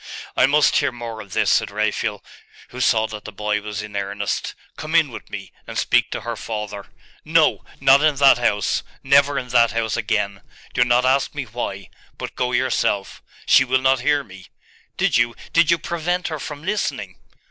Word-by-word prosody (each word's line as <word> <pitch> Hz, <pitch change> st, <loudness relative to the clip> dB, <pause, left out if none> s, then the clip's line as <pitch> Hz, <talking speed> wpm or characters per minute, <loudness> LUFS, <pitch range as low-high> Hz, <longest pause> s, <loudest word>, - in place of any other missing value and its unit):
'I -, -, +5 dB
must 150 Hz, +1 st, +3 dB
hear 140 Hz, -2 st, +1 dB
more 115 Hz, -2 st, -7 dB
of 100 Hz, -3 st, -12 dB
this,' -, -, +2 dB
said -, -, +2 dB
Raphael, -, -, -2 dB, 0.5 s
who 125 Hz, -, -7 dB
saw 110 Hz, -3 st, +3 dB
that 110 Hz, -1 st, -7 dB
the 110 Hz, -, -8 dB
boy 105 Hz, +1 st, -2 dB
was 105 Hz, 0 st, -5 dB
in 105 Hz, -1 st, -9 dB
earnest. 100 Hz, +1 st, -3 dB, 0.2 s
'Come 155 Hz, +2 st, -5 dB
in 155 Hz, -5 st, +4 dB
with -, -, -10 dB
me, 95 Hz, -2 st, -8 dB, 0.2 s
and -, -, -6 dB
speak -, -, +2 dB
to -, -, -4 dB
her -, -, -4 dB
father.' 105 Hz, -2 st, -6 dB, 0.4 s
'No! -, -, +2 dB, 0.2 s
not 135 Hz, +1 st, +6 dB
in 155 Hz, -1 st, +3 dB
that 135 Hz, -2 st, +5 dB
house! 105 Hz, -4 st, +1 dB, 0.2 s
Never 140 Hz, +1 st, +4 dB
in 125 Hz, -2 st, -4 dB
that 120 Hz, -3 st, +4 dB
house 115 Hz, -1 st, -1 dB
again! 105 Hz, -3 st, -1 dB, 0.3 s
Do 125 Hz, -, +4 dB
not 120 Hz, +1 st, +2 dB
ask 130 Hz, +2 st, +1 dB
me 145 Hz, -, -2 dB
why: 105 Hz, -5 st, -6 dB, 0.3 s
but -, -, -7 dB
go 125 Hz, 0 st, -1 dB
yourself. 120 Hz, -5 st, 0 dB, 0.2 s
She -, -, +6 dB
will 130 Hz, 0 st, +2 dB
not 130 Hz, 0 st, +3 dB
hear 145 Hz, +3 st, +1 dB
me. 95 Hz, -5 st, -14 dB, 0.5 s
Did -, -, +2 dB
you 120 Hz, 0 st, +1 dB, 0.2 s
did 165 Hz, -1 st, +4 dB
you 170 Hz, -, +4 dB
prevent 170 Hz, +2 st, -2 dB
her 155 Hz, -2 st, -4 dB
from 145 Hz, +1 st, -7 dB
listening? 210 Hz, +4 st, -3 dB
120 Hz, 190 wpm, -21 LUFS, 105-140 Hz, 0.5 s, not